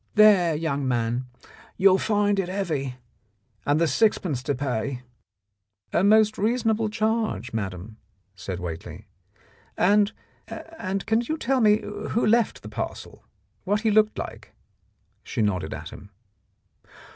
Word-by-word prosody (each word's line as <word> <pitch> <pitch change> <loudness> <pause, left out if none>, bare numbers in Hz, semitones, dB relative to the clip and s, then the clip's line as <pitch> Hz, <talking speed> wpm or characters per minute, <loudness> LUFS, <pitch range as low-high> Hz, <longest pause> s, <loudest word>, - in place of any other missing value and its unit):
There, 200 -6 +6
young 145 -3 -1
man, 120 0 -1 0.5
you'll 190 0 +5
find 205 -1 +1
it 185 -2 -1
heavy, 155 -10 -2 0.7
and 145 +2 +3
there's 165 -1 +2
sixpence 185 - +1
to 140 +2 -1
pay." 125 -1 -3 0.5
' 100 0 -42
"A 175 - +2
most 215 0 +4
reasonable 220 0 +1
charge, 220 - -1
madam," 100 0 -5 0.4
said 90 -1 -6
Whately. 85 -3 -7 0.7
"And— 205 +2 +4 0.4
and 195 - -5
can 225 +1 +2
you 310 +7 -3
tell 265 -2 +1
rne 215 -1 +4 0.3
who 235 - +2
left 230 +1 +2
the - - -8
parcel - - -6 0.2
— - - -44
what 205 +2 0
he 220 -1 +2
looked 215 0 +3
like? - - -7 0.3
" - - -44
She 110 - -2
nodded 90 -6 -1
at - - -6
him. 100 - -12
185 Hz, 140 wpm, -25 LUFS, -, 0.7 s, There